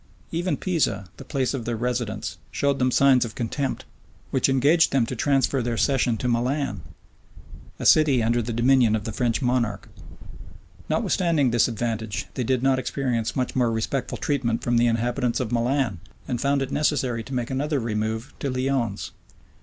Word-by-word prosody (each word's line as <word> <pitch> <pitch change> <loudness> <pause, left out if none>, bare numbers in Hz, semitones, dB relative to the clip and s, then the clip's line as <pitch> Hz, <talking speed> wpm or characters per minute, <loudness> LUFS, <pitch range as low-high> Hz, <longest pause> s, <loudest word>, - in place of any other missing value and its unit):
Even 175 +2 -1
Pisa, 140 - 0
the - - -9
place 135 -2 -1
of 125 -5 -4
their 120 - -1
residence, 120 -2 -3
showed 140 -1 0
them 130 0 +3
signs 130 0 +4
of 115 -3 -6
contempt; 130 +3 -3 0.5
which 130 0 +2
engaged 145 +6 +4
them 135 -4 +2
to 130 - -5
transfer 135 +1 +1
their 120 -1 -2
session 125 -4 +2
to 125 - -2
Milan, 125 -3 -1 1.0
a - - -6
city 145 -6 +5
under 120 +2 +2
the 120 +1 -4
dominion 120 -1 +3
of 110 - -2
the 110 - -4
French 120 +2 0
monarch; 120 -5 0 1.0
Notwithstanding 160 -8 +1
this 120 -1 +3
advantage, 110 -2 -3
they 125 - -2
did 130 +1 0
not 135 -1 +3
experience 125 -3 -2
much 130 -2 -2
more 125 -3 +2
respectful 115 +3 -2
treatment 125 -6 -1
from 120 -1 +1
the 120 +1 +4
inhabitants 120 +2 0
of 125 -4 -3
Milan; 120 -4 0 0.3
and 120 -1 -2
found 140 0 +1
it 135 - -6
necessary 130 -6 0
to 130 +4 -6
make 120 0 -2
another 145 +2 0
remove 110 +1 -3
to 140 - -2
Lyons. 130 -5 -1
125 Hz, 170 wpm, -24 LUFS, 115-135 Hz, 1.0 s, city